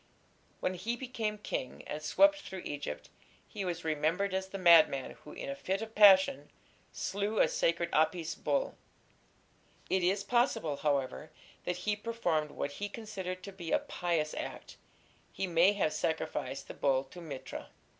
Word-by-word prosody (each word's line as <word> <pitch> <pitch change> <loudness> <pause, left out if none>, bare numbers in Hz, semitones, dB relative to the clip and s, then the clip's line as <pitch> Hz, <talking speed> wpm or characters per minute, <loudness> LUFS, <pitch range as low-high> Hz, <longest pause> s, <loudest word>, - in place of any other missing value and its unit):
When 185 - 0
he 205 +7 -2
became 230 -4 -3
king, 165 -10 -4
and 150 - -5
swept 295 - +4
through 190 -2 -7
Egypt, 145 - -5 0.4
he 200 - -5
was 175 -2 -3
remembered 160 +6 0
as 190 0 -1
the 195 - -6
madman 165 -7 +6
who 150 - -13
in - - -7
a 140 - -3
fit 190 +7 -2
of 220 0 -8
passion 190 -9 +6 0.4
slew 205 +3 -2
a - - +5
sacred 170 0 0
Apis 160 +1 +2
bull. - - -1 1.2
It 190 - +3
is 195 +3 +1
possible, 240 - +1
however, 145 +1 -1 0.4
that 180 - -1
he 210 -1 +2
performed 205 -9 -1
what 145 - -4
he 205 +8 -4
considered 190 -4 -6
to 200 - -7
be 175 -4 -7
a - - +5
pious 165 -4 -1
act: - - -6 0.6
he 195 - -2
may 175 +2 +4
have 185 -7 0
sacrificed 160 0 -2
the - - -7
bull 135 -1 +2
to 175 +6 -12
Mithra. 145 -6 -7
180 Hz, 160 wpm, -32 LUFS, 155-205 Hz, 1.2 s, madman